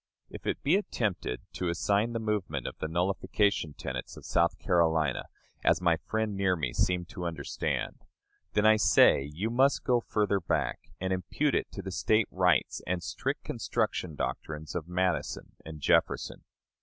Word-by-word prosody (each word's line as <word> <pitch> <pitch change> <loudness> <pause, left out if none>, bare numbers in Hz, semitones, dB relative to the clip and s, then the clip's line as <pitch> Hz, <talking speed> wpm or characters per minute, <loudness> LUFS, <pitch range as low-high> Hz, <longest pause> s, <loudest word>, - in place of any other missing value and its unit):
If - - -8
it - - -2
be 155 +8 +4
attempted 100 - -2
to 90 - -2
assign 100 +7 +1
the 115 - -1
movement 100 - -2
to - - -3
the 80 - -2
nullification 90 0 0
tenets 65 -1 -5
of - - -11
South 85 0 +2
Carolina, 80 -6 +2 0.4
as - - +4
my 85 -2 +3
friend 110 +4 -2
near 95 -2 +2
me 75 -7 -2
seemed 90 +5 +1
to 90 - -6
understand, 80 -5 -3 0.5
then 105 - +2
I 110 0 +7
say 70 -8 +5
you 100 +9 -2
must 135 +4 +3
go 125 -2 +3
further 105 -3 0
back, 85 - -2
and 95 0 -1
impute 95 +11 0
it - - 0
to - - -6
the 95 - -5
State 110 +3 +2
rights 90 -1 +2
and 90 0 -1
strict 90 - -3
construction 80 -4 -2
doctrines 75 +1 -4
of 85 -2 -4
Madison 90 +1 -1
and 80 -1 -8
Jefferson. - - +1
90 Hz, 165 wpm, -29 LUFS, 80-105 Hz, 0.5 s, I